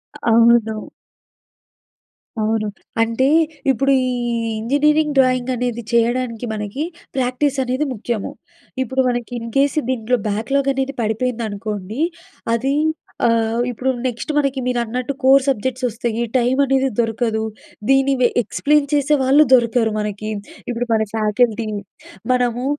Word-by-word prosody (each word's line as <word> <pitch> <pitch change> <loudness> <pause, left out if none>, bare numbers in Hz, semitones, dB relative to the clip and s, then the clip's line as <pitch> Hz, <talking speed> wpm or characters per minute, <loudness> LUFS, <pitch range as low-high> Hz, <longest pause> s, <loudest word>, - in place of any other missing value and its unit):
అ - - -11
అవ్వదు. 230 -1 +4 1.6
అవును. 215 0 0 0.3
అంటే, 230 +4 +2 0.4
ఇప్పుడు 275 +2 +1
ఈ - - 0 0.5
ఇంజనీరింగ్ 295 +5 +2
డ్రాయింగ్ 255 -1 +2
అనేది 240 -1 -2
చేయడానికి 235 0 +1
మనకి 210 +7 -4 0.3
ప్రాక్టీస్ 260 +2 0
అనేది 255 +4 -1
ముఖ్యము. 225 -1 -3 0.5
ఇప్పుడు 260 +1 0
మనకి 240 -1 -3
ఇన్ 230 0 -6
కేస్ 280 +2 +2
దీంట్లో 250 -1 0
బ్యాక్‌లాగ్ 265 +7 0
అనేది 270 0 -2
పడిపోయిందనుకోండి, 220 -1 -3 0.5
అది 270 +4 0 0.5
ఆహ్, 230 0 +2
ఇప్పుడు 250 +2 -1 0.2
నెక్స్ట్ 245 +5 -4
మనకి 275 -2 +1
మీరన్నట్టు 250 +1 -1
కోర్ 265 +1 +6
సబ్జెక్ట్స్ 260 0 -1
వస్తాయి, 235 0 -2
టైమ్ 255 +2 +2
అనేది 270 0 +2
దొరకదు. 225 -1 0 0.5
దీన్ని 270 0 +4
వె 245 - +5
ఎక్స్‌ప్లెయిన్ 290 +6 +1
చేసేవాళ్ళు 285 0 +4
దొరకరు 235 -2 +3
మనకి. 210 0 -4 0.4
ఇప్పుడు 240 0 -2
మన 220 - +2
ఫ్యాకల్టీ, 220 +1 +1 0.6
మనము, 245 0 +1
245 Hz, 115 wpm, -20 LUFS, 225-265 Hz, 1.6 s, కోర్